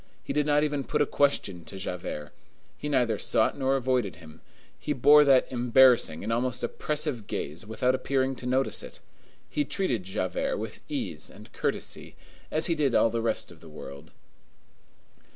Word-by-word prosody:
He - - -4
did 150 0 +1
not 150 0 +3
even 145 -2 -1
put - - +1
a - - 0
question 115 -12 +1
to 95 - -8
Javert; 90 -5 -5 0.4
he 150 - -5
neither 120 -6 +1
sought 110 - +2
nor 135 -1 +1
avoided 125 - 0
him; 80 -1 -14 0.4
he 150 - -2
bore 145 +3 +7
that 135 -3 +5
embarrassing 125 -8 +4
and 115 - -1
almost 125 +1 -1
oppressive 150 -7 -2
gaze 80 +9 -5
without 125 +3 +1
appearing 130 0 0
to 125 - -6
notice 130 +2 +1
it. - - -10 0.5
He 295 - 0
treated 185 - -1
Javert - - -2
with - - -6
ease 280 -5 -4
and - - -15
courtesy, - - -3 0.3
as - - +1
he 170 - +2
did 145 -5 +1
all 115 - +4
the 115 0 -1
rest 115 -5 -1
of 80 - -16
the 80 - -12
world. 75 0 -10
125 Hz, 170 wpm, -27 LUFS, 105-145 Hz, 0.5 s, bore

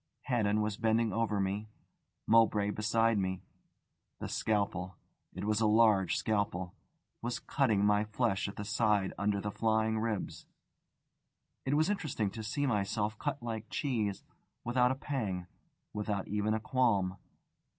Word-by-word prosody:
Haddon 110 -4 +1
was 105 -1 -1
bending 110 -1 +2
over 110 -2 0
me, 100 +2 -2 0.6
Mowbray 110 -2 +4
behind 115 0 +2
me; 95 -1 -2 0.7
the - - -5
scalpel 95 -4 -1 0.4
it 95 - -5
was 105 +1 +1
a 110 - +4
large 105 -4 +4
scalpel 100 -4 -1 0.5
was 120 +1 -2
cutting 110 -8 +1
my 105 +1 +3
flesh 105 -2 0
at 100 - -7
the 105 - -5
side 105 -2 +1
under 100 0 +1
the 105 +1 -3
flying 110 0 +1
ribs. 110 -3 -3 1.2
It 135 +2 +1
was 155 +2 +3
interesting 140 - -1
to 110 - -6
see 130 +7 -1
myself 105 -2 0
cut 140 -4 -3
like 110 -2 -4
cheese, 110 -9 -1 0.4
without 125 +1 +3
a 130 - 0
pang, 110 -11 -3 0.5
without 105 -2 -2
even 105 +1 0
a - - -1
qualm. 105 -6 +1
110 Hz, 140 wpm, -32 LUFS, 100-115 Hz, 1.2 s, Mowbray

